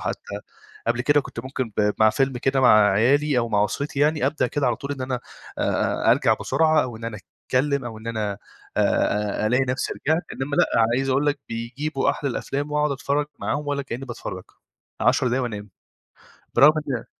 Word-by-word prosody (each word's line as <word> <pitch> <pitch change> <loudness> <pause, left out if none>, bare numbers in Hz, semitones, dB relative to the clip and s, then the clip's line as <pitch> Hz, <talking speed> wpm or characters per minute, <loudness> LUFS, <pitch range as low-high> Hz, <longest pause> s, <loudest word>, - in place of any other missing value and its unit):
حتّى - - -5 0.5
قبل - - +1
كده 145 0 +4
كنت - - -7
ممكن 130 -3 -4
ب 105 0 +3
مع 110 0 +6
فيلم 135 +4 +1
كده 135 +2 +1
مع 110 -5 +6
عيالي 135 +7 +3
أو 120 -1 0
مع 105 -2 +2
أسرتي 140 +5 -3
يعني، 150 -2 +2
أبدأ 150 +3 +1
كده 145 -3 -1
على 120 - +1
طول 140 +1 -5
إن 135 - -5
أنا 130 -1 -2 0.4
آآ - - +1
أرجع - - +3
بسرعة 155 -1 +3
أو 120 -3 -5
إن 115 - -9
أنا 115 -2 -5 0.3
أتكلّم 140 +1 +1
أو 110 -2 -6
إن 110 - -12
أنا 105 -3 -2 0.4
آآ 105 0 +1
أ - - +2
ألاقي 125 +4 +2
نفسي 130 +1 -1
رجعت، 160 +4 0
إنمّا 145 +2 -3
لأ - - +5 0.3
عايز 135 +1 -1
أقول 135 +3 +1
لك 145 - +1
بيجيبوا 130 +6 -2
أحد - - -6
الأفلام 140 +2 -3
وأقعد 150 0 +1
أتفرّج 140 +3 -1
معاهم 145 +1 -2
ولا 140 -1 -1
كإنّي 135 -1 -6
باتفرّج، 120 - -6 0.6
10 130 - +3
دقايق 130 +2 0
وأنام. 105 -4 -5 0.8
برغم 150 +2 +7 0.2
إن 125 -4 -2
130 Hz, 190 wpm, -23 LUFS, 115-145 Hz, 0.8 s, برغم